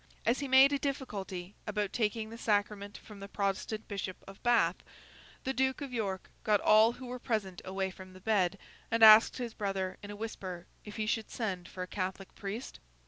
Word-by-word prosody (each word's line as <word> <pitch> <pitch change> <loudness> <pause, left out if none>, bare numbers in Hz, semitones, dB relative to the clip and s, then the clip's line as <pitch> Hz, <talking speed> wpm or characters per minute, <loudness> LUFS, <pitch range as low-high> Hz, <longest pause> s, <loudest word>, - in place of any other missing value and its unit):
As 235 +3 +2
he 280 - -3
made 265 +2 +7
a 280 - +1
difficulty 200 -10 -4
about 210 -1 -1
taking 220 -1 -1
the 230 - -8
sacrament 205 -2 0
from 210 -2 -13
the 200 - -7
Protestant 200 +2 -2
Bishop 195 -2 -4
of 195 0 -12
Bath, 230 -8 +3 0.7
the 265 - -1
Duke 265 0 +1
of 280 -3 -6
York 195 -5 -3
got 210 -2 +3
all 220 +3 +6
who 255 - -10
were 250 0 -6
present 215 -7 -2
away 190 0 -2
from 185 0 -12
the 185 - -12
bed, 200 -2 +1 0.3
and 230 0 +2
asked 215 +1 +9
his 240 -3 -4
brother, 195 -3 -2
in 205 - -9
a 205 - -6
whisper, 190 -5 -6 0.2
if 210 - -9
he 215 - -1
should 220 0 -1
send 185 -6 -3
for 185 - -6
a - - -6
Catholic 190 0 -4
priest? 210 +5 -6
210 Hz, 195 wpm, -32 LUFS, 190-230 Hz, 0.7 s, asked